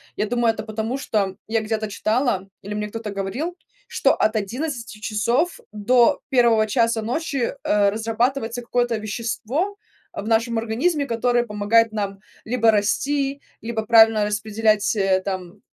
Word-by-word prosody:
Я 210 - -1
думаю, 240 0 +2
это 215 - -6
потому, 220 +3 -3
что 200 -7 -1
я 225 +1 +1
где-то 215 0 -2
читала 215 -1 0
или 205 +2 -6
мне 210 0 -3
кто-то 220 0 -6
говорил, 215 - -4 0.3
что - - +2
от 215 +1 +1
11 230 +1 -4
часов 235 - 0
до 235 +3 +3
1 235 -5 +4
часа 230 +1 +1
ночи, 260 +2 -2
э, 205 -1 +3
разрабатывается 230 +3 -1
какое-то 240 0 0
вещество 235 - -3 0.4
в 205 - -6
нашем 230 +1 +1
организме, 265 +8 0
которое 240 0 +1
помогает 215 +1 +2
нам 200 -2 -3 0.3
либо 230 -1 +3
расти, 275 +7 0 0.2
либо 225 -1 -3
правильно 225 -2 +6
распределять, 215 +1 +1
э, 195 -2 +2
там 185 -3 -5
225 Hz, 140 wpm, -22 LUFS, 210-245 Hz, 0.4 s, правильно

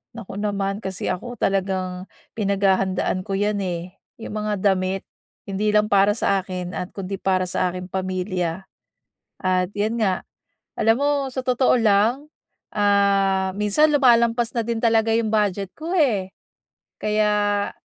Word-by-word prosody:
naku 205 -3 -7
naman. 200 -1 -2
Kasi 190 -4 -3
ako 240 +7 -5
talagang, 190 -2 -1 0.3
pinaghahandaan 195 -2 +1
ko 195 - -1
'yan, 205 +1 0
eh, 180 0 -5 0.2
'yong 225 - -8
mga 210 -2 -3
damit, 190 -1 +1 0.4
hindi 210 +2 -1
lang 210 0 +3
para 200 +1 +4
sa 200 -3 +1
akin 180 -1 -5
at 180 - -6
kundi 195 0 -5
para 185 -1 +1
sa 180 0 0
aking 180 0 -7
pamilya. 185 -1 -2 0.7
At, 185 -1 0
'yan 220 +3 0
nga. 190 -3 0 0.6
Alam 225 +1 +4
mo, 285 +3 +1 0.2
sa 260 0 -5
totoo 255 0 +3
lang, 225 +4 +2 0.5
ah, 200 -2 +2
minsan 210 +10 +2
lumalampas 235 -3 +3
na 230 - +1
din 230 0 -2
talaga 225 -1 +3
'yong 225 0 +1
budget 205 -3 0
ko, 325 +3 -5
eh, 220 - +1 0.7
kaya 210 -1 +1
200 Hz, 140 wpm, -22 LUFS, 190-220 Hz, 0.7 s, para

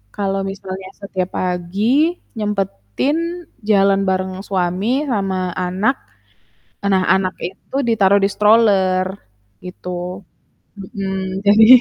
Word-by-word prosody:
kalau 195 -1 -1
misalnya 190 -1 -6
setiap 190 -2 -3
pagi, 205 - +1 0.2
nyempetin 215 - -2 0.2
jalan 195 -2 +4
bareng 185 0 -1
suami 195 +9 0
sama 190 -5 -1
anak, 185 +8 +1 0.9
nah 190 -2 +3
anak 190 -1 +1
itu 190 +8 -9
ditaruh 200 -3 +4
di 200 - +3
stroller 200 -4 +4 0.6
gitu. 180 +1 -6 0.5
Mhm, 190 -1 -4
jadi 215 +2 +7
195 Hz, 95 wpm, -19 LUFS, 185-210 Hz, 0.9 s, jadi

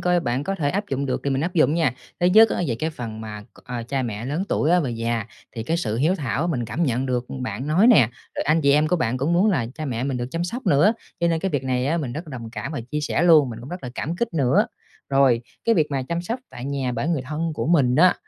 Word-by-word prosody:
coi 180 -1 +2
bạn 125 0 -1
có 195 - -1
thể 145 -6 0
áp 200 +5 -1
dụng 140 +1 -2
được 130 - -1
thì 140 - 0
mình 135 - 0
áp 175 +5 -2
dụng 155 -1 +4
nha. 160 -8 +1 0.3
Thứ 175 - +4
nhất 220 +5 +7
á - - -1
về 120 - 0
cái 155 +8 -2
phần 115 -7 -7
mà 105 -1 -7
c - - -19
à, 125 -2 -4
cha 130 +3 -2
mẹ 115 -2 -4
lớn 150 +7 -1
tuổi 155 - +1
á 180 0 +5
và 140 - -2
già 115 -1 -2 0.3
thì 115 - -5
cái 165 +8 -1
sự 110 -11 -2
hiếu 155 +9 +2
thảo 145 -1 -1
mình 125 -7 -1
cảm 150 +9 -3
nhận, 125 -6 0
ừm, 135 - -2
được 125 -1 -1 0.2
bạn 125 +2 -4
nói 175 +9 +4
nè, 140 - +6 0.3
rồi - - 0
anh 155 +3 +3
chị 140 -1 +4
em 150 +2 +4
của 180 - +2
bạn 125 -6 0
cũng 140 +6 0
muốn 190 +5 +4
là 135 - 0
cha 155 - -5
mẹ 125 -3 -2
mình 135 -2 -1
được 120 0 -3
chăm 165 +1 -2
sóc 245 +9 -5
nữa, 150 +10 +5 0.3
cho 170 - +3
nên 165 -1 0
cái 190 - -1
việc 145 -4 -1
này 130 0 0
á 160 - +1
mình 130 -6 -3
rất 160 +2 -6
là - - -9
đồng 115 -1 -8
cảm 110 +6 -5
và 145 - -3
chia 150 - -1
sẻ 150 - 0
luôn, 155 -6 +6
mình 115 0 -7
cũng 125 - -10
rất 180 0 -7
là 125 - -5
cảm 165 +6 -3
kích 230 -2 -2
nữa. 135 -6 +3 0.4
Rồi 135 -4 +4 0.2
cái 230 - +4
việc 155 -4 +3
mà 135 -2 -1
chăm 170 +6 -3
sóc 230 +8 -4
tại 120 - -8
nhà 135 -2 -2
bởi 120 +7 -2
người 160 -6 0
thân 155 +5 -3
của - - -2
mình 140 -7 +3
á, 180 +4 +6
140 Hz, 305 wpm, -23 LUFS, 125-170 Hz, 0.4 s, nhất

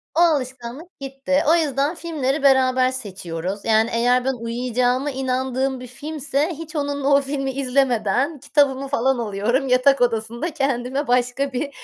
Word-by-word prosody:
O - - +2
alışkanlık 265 0 -1
gitti. 275 +1 -1
O 335 - +6
yüzden 290 0 0
filmleri 295 -4 -2
beraber 260 -1 +4
seçiyoruz 190 -5 -6
yani 220 +1 +3
eğer 245 +2 +2
ben 265 - +1
uyuyacağıma 245 +3 -1
inandığım 260 0 -1
bir 250 - -9
filmse 295 +3 -3
hiç 320 +1 -9
onunla 285 -1 -2
o 280 - +5
filmi 275 -1 -3
izlemeden 265 +1 0
kitabımı 275 -1 +1
falan 265 -1 +1
alıyorum 235 +5 -1
yatak 255 +2 +4
odasında 235 +6 -1
kendime 270 -1 -1
başka 250 +2 0
bir 280 +3 -2
265 Hz, 140 wpm, -22 LUFS, 245-280 Hz, -, O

